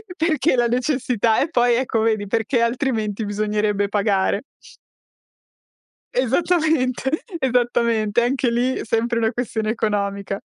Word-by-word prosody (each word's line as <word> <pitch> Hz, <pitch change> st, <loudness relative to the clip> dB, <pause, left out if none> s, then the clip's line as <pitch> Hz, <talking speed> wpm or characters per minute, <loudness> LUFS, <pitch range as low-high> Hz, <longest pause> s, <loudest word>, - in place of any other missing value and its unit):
perché 315 Hz, -4 st, +1 dB
la 240 Hz, -1 st, +2 dB
necessità 245 Hz, -3 st, +1 dB
e 290 Hz, -, 0 dB
poi 245 Hz, -5 st, +3 dB
ecco 235 Hz, -2 st, 0 dB
vedi 215 Hz, -2 st, 0 dB
perché 225 Hz, +3 st, 0 dB
altrimenti 230 Hz, -4 st, -1 dB
bisognerebbe 210 Hz, 0 st, 0 dB
pagare. 200 Hz, 0 st, +1 dB, 1.7 s
Esattamente, 265 Hz, 0 st, +1 dB, 0.3 s
esattamente 235 Hz, -4 st, +1 dB
anche 255 Hz, +1 st, +1 dB
lì 245 Hz, +2 st, +1 dB
è -, -, -5 dB
sempre 235 Hz, +1 st, 0 dB
una 225 Hz, -1 st, +1 dB
questione 225 Hz, -3 st, -3 dB
economica. 200 Hz, -3 st, -2 dB
235 Hz, 115 wpm, -21 LUFS, 215-255 Hz, 1.7 s, poi